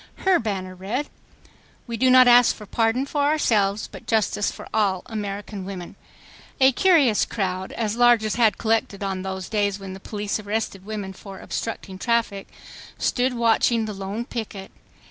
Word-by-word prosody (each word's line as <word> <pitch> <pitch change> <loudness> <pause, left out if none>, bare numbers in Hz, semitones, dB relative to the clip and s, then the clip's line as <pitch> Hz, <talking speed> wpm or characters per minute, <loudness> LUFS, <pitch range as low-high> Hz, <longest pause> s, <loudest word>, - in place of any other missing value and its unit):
Her 380 -2 +5
banner 190 -5 -3
read, 210 +11 -4 0.7
"We 235 - -5
do 255 +3 +3
not 255 0 +7
ask 245 -1 +6
pardon 230 +3 +1
for 290 +1 -2
ourselves 215 -9 +1
but - - -12
justice 215 -2 +1
for - - -10
all 195 -4 +1
American 205 -3 -5
women." 185 -2 -7 0.6
A 265 0 +6
curious 285 - +4
crowd, 190 -3 -3
as 220 -2 -2
large 240 -2 +5
as 215 - -1
had 220 -4 +3
collected 220 -3 0
on 190 -1 -2
those 190 0 -5
days 205 -3 0
when 195 -1 -8
the 190 - -9
police 205 +1 -3
arrested 205 -2 -4
women 205 -3 -5
for 195 0 -11
"obstructing 195 -4 -5
traffic," 230 -3 0 0.5
stood 250 0 0
watching 230 0 +2
the 215 - -5
lone 200 +4 -5
picket. 210 -6 -6
215 Hz, 160 wpm, -23 LUFS, 195-235 Hz, 0.7 s, not